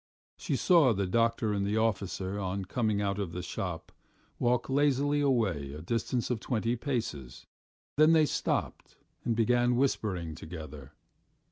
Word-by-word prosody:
She - - -2
saw 165 -9 +5
the 100 -1 -1
doctor 115 +2 +1
and 100 -1 0
the 100 +2 0
officer, 100 -3 -1
on 95 0 -3
coming 105 0 0
out 100 0 -1
of 95 -5 -3
the 90 - -4
shop, 90 -2 -5 0.5
walk 120 0 +1
lazily 145 +1 +2
away 100 - 0
a 75 - -7
distance 115 +5 -1
of 120 - -1
twenty 115 +1 -1
paces; 115 - -4 0.5
then 155 +2 +6
they 160 -1 +5
stopped - - -2 0.3
and 115 -2 0
began 120 +2 +3
whispering 100 - 0
together. 80 -3 -9
110 Hz, 145 wpm, -30 LUFS, 90-125 Hz, 0.5 s, then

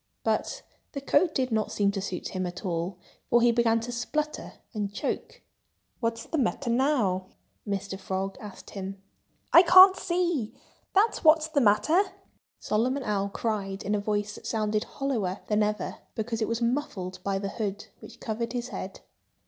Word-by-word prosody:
But - - -1 0.3
the 280 - -3
coat 310 +4 +2
did 255 -2 0
not 220 -1 0
seem 200 -1 +2
to 195 -1 -3
suit 185 -2 -4
him 185 -2 -2
at 180 +3 -7
all, 175 +1 -2 0.3
for 240 - +5
he 240 0 +5
began 230 -1 +3
to 245 +2 -5
splutter 300 +6 -3 0.2
and 205 -3 -2
choke. 475 - -4 0.6
"What's 230 -1 -2
the 320 - -2
matter 240 -1 0
now?" 230 -8 +1 0.4
Mr. 195 -1 -3
Frog 190 0 -3
asked 210 -3 -10
him. 195 0 -6 0.5
"I 340 - +11
can't 370 +2 +9
see—that's 350 - -1
what's 315 0 +5
the 300 -3 +2
matter!" 220 - +4 0.6
Solomon 255 +6 0
Owl 200 -3 0
cried 200 -2 -3
in 205 - -1
a 210 - +2
voice 205 0 -1
that - - -9
sounded 215 -1 0
hollower 220 -9 -2
than 210 0 +1
ever, 210 0 -1 0.2
because 225 +1 -3
it 220 - +1
was 230 +1 -1
muffled 210 -8 -2
by 195 -1 0
the 195 0 -3
hood, 210 0 -4
which - - -13
covered 230 +2 -3
his 245 0 -3
head. 190 - -6
220 Hz, 165 wpm, -27 LUFS, 200-265 Hz, 0.6 s, I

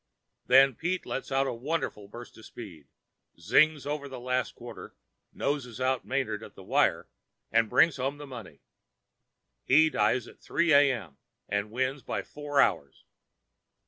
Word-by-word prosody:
Then 135 +1 +6
Pete 175 +8 -3
lets 135 - -5
out 135 +1 +2
a 135 - -2
wonderful 120 -5 -3
burst 120 +4 -11
of 110 - -13
speed, 85 - -11 0.5
'zings' 150 - +3
over 145 -1 -4
the 130 -2 -8
last 125 0 -2
quarter, 120 0 -10 0.4
noses 130 -5 -3
out 130 -1 0
Manard 130 -6 -2
at - - -12
the - - -12
wire, - - +1 0.4
and 115 -1 +3
brings 165 -4 +4
home 135 +2 -2
the 145 - -9
money. 125 -7 -10 1.0
He 155 +4 +5
dies 110 +2 +1
at - - -15
3 170 0 +1
A.M. 125 - +3 0.3
and 100 +1 -2
wins 130 +4 -2
by - - -4
four 145 -1 -3
hours. 80 - +1
130 Hz, 150 wpm, -28 LUFS, 115-145 Hz, 1.0 s, Then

